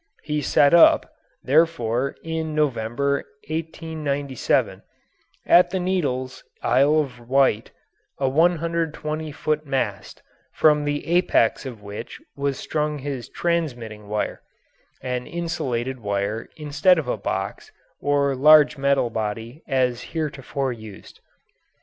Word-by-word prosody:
He 150 Hz, -1 st, -2 dB
set 145 Hz, +1 st, +4 dB
up, 170 Hz, -, +6 dB, 0.3 s
therefore 140 Hz, -4 st, +1 dB
(in 160 Hz, -1 st, -3 dB
November, 140 Hz, -1 st, 0 dB, 0.3 s
1897), 155 Hz, -4 st, -2 dB, 0.6 s
at 175 Hz, 0 st, +6 dB
the 190 Hz, +1 st, -2 dB
Needles, 140 Hz, -9 st, -2 dB, 0.2 s
Isle 140 Hz, +5 st, +4 dB
of 130 Hz, -4 st, -7 dB
Wight, 130 Hz, -5 st, +2 dB, 0.5 s
a 135 Hz, -, 0 dB
120 160 Hz, 0 st, 0 dB
foot 150 Hz, +1 st, -2 dB
mast, 110 Hz, -7 st, -3 dB, 0.3 s
from 150 Hz, -1 st, +3 dB
the 145 Hz, 0 st, -2 dB
apex 165 Hz, -7 st, +2 dB
of 115 Hz, -5 st, -9 dB
which 100 Hz, +3 st, -8 dB, 0.2 s
was 140 Hz, -1 st, -1 dB
strung 150 Hz, -1 st, -2 dB
his 135 Hz, -3 st, -5 dB
transmitting 120 Hz, -12 st, -3 dB
wire 105 Hz, 0 st, -3 dB, 0.6 s
(an 125 Hz, -1 st, -3 dB
insulated 130 Hz, -7 st, -3 dB
wire, 100 Hz, +1 st, -2 dB
instead 150 Hz, +4 st, +3 dB
of 155 Hz, -5 st, -2 dB
a -, -, 0 dB
box, 95 Hz, -2 st, -4 dB, 0.3 s
or 140 Hz, -1 st, +1 dB
large 150 Hz, +1 st, +6 dB
metal 140 Hz, -3 st, +2 dB
body, 115 Hz, +6 st, -4 dB
as 125 Hz, -3 st, +1 dB
heretofore 140 Hz, -4 st, -2 dB
used). 110 Hz, -3 st, -12 dB
140 Hz, 115 wpm, -23 LUFS, 120-155 Hz, 0.6 s, up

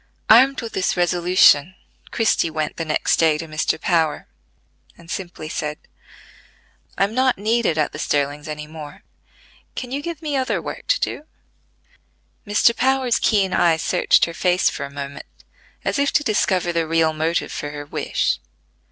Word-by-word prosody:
Armed 265 Hz, +5 st, +6 dB
with 230 Hz, -, -7 dB
this 185 Hz, -, -1 dB
resolution, 175 Hz, -2 st, +4 dB, 0.3 s
Christie 220 Hz, -7 st, +1 dB
went 155 Hz, -1 st, -3 dB
the 165 Hz, -, -3 dB
next 155 Hz, -, +1 dB
day 160 Hz, -2 st, +3 dB
to 165 Hz, -, -6 dB
Mr. 155 Hz, 0 st, -1 dB
Power, 160 Hz, -3 st, 0 dB, 0.7 s
and 170 Hz, 0 st, -13 dB
simply 175 Hz, -4 st, -6 dB
said: 150 Hz, -1 st, -4 dB, 1.2 s
"I -, -, +3 dB
am 200 Hz, +2 st, -1 dB
not 260 Hz, +1 st, +2 dB
needed 215 Hz, -4 st, 0 dB
at 155 Hz, -, +1 dB
the 155 Hz, -, -8 dB
Sterlings 145 Hz, 0 st, -1 dB
any 150 Hz, 0 st, -6 dB
more: 150 Hz, -1 st, -11 dB, 0.7 s
can 250 Hz, -1 st, -6 dB
you 280 Hz, +2 st, -2 dB
give 330 Hz, 0 st, -6 dB
me 295 Hz, -2 st, -2 dB
other 260 Hz, -1 st, 0 dB
work -, -, -8 dB
to -, -, +2 dB
do?" 300 Hz, -, -4 dB, 1.2 s
Mr. 210 Hz, +3 st, +3 dB
Power's 260 Hz, -2 st, +1 dB
keen 195 Hz, -4 st, +2 dB
eye 170 Hz, -2 st, +3 dB
searched 160 Hz, -, +3 dB
her 170 Hz, -, -7 dB
face 180 Hz, +1 st, +2 dB
for 140 Hz, -, -5 dB
a -, -, -15 dB
moment, 140 Hz, 0 st, -7 dB, 0.6 s
as -, -, 0 dB
if 280 Hz, 0 st, +2 dB
to 295 Hz, -, +2 dB
discover 185 Hz, -6 st, 0 dB
the 165 Hz, -1 st, 0 dB
real 160 Hz, -1 st, +2 dB
motive 160 Hz, +2 st, -1 dB
for 145 Hz, -, -5 dB
her 145 Hz, 0 st, -7 dB
wish. -, -, -1 dB
175 Hz, 165 wpm, -21 LUFS, 155-230 Hz, 1.2 s, Armed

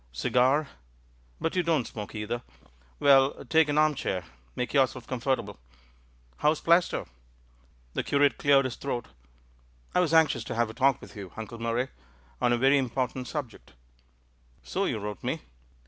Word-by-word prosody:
"Cigar? 130 Hz, -, +2 dB, 0.7 s
But 165 Hz, -, -2 dB
you 180 Hz, -, +3 dB
don't 160 Hz, -7 st, +1 dB
smoke 105 Hz, 0 st, -7 dB
either! 110 Hz, +3 st, -3 dB, 0.6 s
Well, 140 Hz, 0 st, +4 dB
take 160 Hz, +2 st, +3 dB
an 145 Hz, -, 0 dB
armchair; 150 Hz, -, +1 dB, 0.3 s
make 125 Hz, -, -3 dB
yourself 130 Hz, -3 st, +2 dB
comfortable. 130 Hz, -, -2 dB, 0.8 s
How's 150 Hz, +1 st, +2 dB
Plaistow?" 170 Hz, +1 st, +2 dB, 0.9 s
The -, -, 0 dB
curate 145 Hz, 0 st, +2 dB
cleared 140 Hz, -1 st, +4 dB
his 130 Hz, -, -4 dB
throat. 125 Hz, -4 st, -4 dB, 0.8 s
"I -, -, +3 dB
was 175 Hz, -4 st, +2 dB
anxious 160 Hz, -7 st, +4 dB
to -, -, -4 dB
have 115 Hz, -1 st, +1 dB
a -, -, -12 dB
talk 135 Hz, +2 st, +2 dB
with -, -, -12 dB
you. 100 Hz, -3 st, -8 dB
Uncle 110 Hz, +1 st, -7 dB
Murray, 115 Hz, +3 st, -1 dB, 0.5 s
on 120 Hz, -, +3 dB
a 120 Hz, -, +3 dB
very 135 Hz, +3 st, +4 dB
important 130 Hz, 0 st, -2 dB
subject." 140 Hz, -7 st, -6 dB, 0.9 s
"So -, -, -1 dB
you -, -, -1 dB
wrote 105 Hz, -2 st, -6 dB
me. -, -, -2 dB
130 Hz, 150 wpm, -28 LUFS, 120-145 Hz, 0.9 s, Well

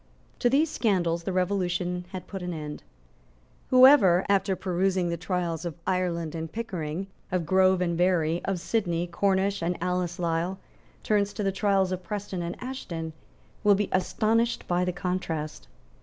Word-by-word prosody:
To 245 Hz, -, +3 dB
these 290 Hz, +5 st, +3 dB
scandals 175 Hz, -6 st, 0 dB
the -, -, -1 dB
Revolution 180 Hz, -1 st, -1 dB
had 185 Hz, -1 st, -7 dB
put 195 Hz, -2 st, -7 dB
an 180 Hz, -1 st, -4 dB
end. 150 Hz, -1 st, -6 dB, 0.9 s
Whoever, 255 Hz, -9 st, +7 dB
after 195 Hz, -1 st, +2 dB
perusing 185 Hz, -1 st, 0 dB
the 170 Hz, -, -1 dB
trials 170 Hz, -1 st, -2 dB
of 170 Hz, -2 st, -5 dB
Ireland 175 Hz, -4 st, -1 dB
and 160 Hz, -1 st, -5 dB
Pickering, 185 Hz, -6 st, -4 dB, 0.3 s
of 180 Hz, -2 st, 0 dB
Grove 185 Hz, +1 st, +4 dB
and 170 Hz, -1 st, 0 dB
Berry, 170 Hz, -2 st, +2 dB
of 195 Hz, -2 st, -1 dB
Sidney, 175 Hz, -4 st, 0 dB
Cornish 195 Hz, +2 st, +1 dB
and 170 Hz, +1 st, -1 dB
Alice 180 Hz, 0 st, -1 dB
Lisle, 170 Hz, +2 st, -1 dB, 0.5 s
turns 205 Hz, -1 st, +1 dB
to 210 Hz, -, -3 dB
the 195 Hz, -, +1 dB
trials 195 Hz, -1 st, +1 dB
of 185 Hz, 0 st, -2 dB
Preston 195 Hz, -1 st, -4 dB
and 170 Hz, +1 st, -4 dB
Ashton, 170 Hz, -11 st, -5 dB, 0.5 s
will 205 Hz, -1 st, +6 dB
be 205 Hz, 0 st, -1 dB
astonished 225 Hz, +5 st, +1 dB
by 175 Hz, 0 st, +1 dB
the 180 Hz, -, 0 dB
contrast. 165 Hz, -, -3 dB
180 Hz, 155 wpm, -27 LUFS, 170-195 Hz, 0.9 s, Whoever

